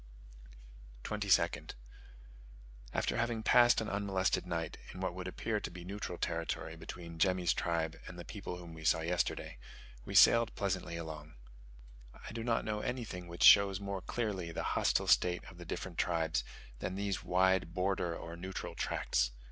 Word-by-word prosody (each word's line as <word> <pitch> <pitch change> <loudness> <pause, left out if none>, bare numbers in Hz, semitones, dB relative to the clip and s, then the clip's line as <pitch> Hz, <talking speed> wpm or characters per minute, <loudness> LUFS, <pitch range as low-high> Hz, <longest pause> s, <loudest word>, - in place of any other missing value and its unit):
22nd. - - +1 1.2
After - - 0
having 115 -1 -1
passed 120 +1 +6
an 110 - -3
unmolested 100 -3 0
night, 85 -2 -3
in 95 - -9
what 95 -1 -2
would 90 0 -6
appear 105 +3 -2
to - - -5
be 85 0 -10
neutral 95 -2 -5
territory 85 -1 -3
between 85 -2 -9
Jemmy's 90 -1 +3
tribe 85 -2 -1
and 90 - -9
the 85 - -8
people 95 -3 -6
whom 85 -2 -10
we 80 -1 -10
saw 80 +1 +3
yesterday, 85 +2 -1 0.4
we 100 - -6
sailed 115 +3 +7
pleasantly 95 -4 -2
along. 80 -2 -7 0.9
I - - -6
do 115 0 -4
not 115 -1 0
know 105 -1 -1
anything 115 -8 -4
which 85 0 -3
shows 100 -2 +8
more 100 -1 -4
clearly 95 -5 -3
the - - -3
hostile - - +2
state 90 0 +3
of 90 - -15
the 85 - -8
different 85 +1 -5
tribes, 80 -2 +1 0.4
than 95 - -3
these 100 0 -2
wide 90 -2 +2
border 90 -2 0
or 85 0 -7
neutral 95 +2 -5
tracts. - - 0
90 Hz, 160 wpm, -34 LUFS, 85-100 Hz, 1.2 s, shows